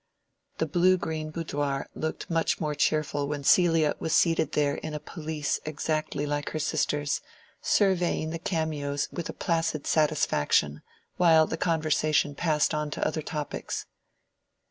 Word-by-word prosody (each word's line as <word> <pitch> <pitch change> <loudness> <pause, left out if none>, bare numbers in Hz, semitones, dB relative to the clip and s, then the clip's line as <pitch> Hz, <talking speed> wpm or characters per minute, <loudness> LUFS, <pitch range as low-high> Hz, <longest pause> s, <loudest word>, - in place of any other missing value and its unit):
The 160 - +1
blue 180 +4 +3
green 160 -3 -4
boudoir 145 -4 -2
looked 160 0 -4
much 165 -1 0
more 150 -2 -1
cheerful 145 -1 0
when 145 -1 -3
Celia 165 -1 +4
was 160 - 0
seated 165 -2 +2
there 145 -1 +2
in 155 -1 -5
a - - -3
pelisse 155 -3 -3
exactly 155 -1 -2
like 145 0 -2
her - - -4
sister's, 145 -1 0 0.4
surveying 180 -5 +2
the 165 - -4
cameos 150 -4 -2
with 175 - -5
a - - -4
placid 165 -4 -1
satisfaction, 75 - +2 0.4
while 165 -3 +6
the 160 - -3
conversation 155 -3 +1
passed 150 0 +1
on 150 0 -1
to - - -1
other 155 0 -2
topics. 150 -1 -4
155 Hz, 145 wpm, -27 LUFS, 145-165 Hz, 0.4 s, while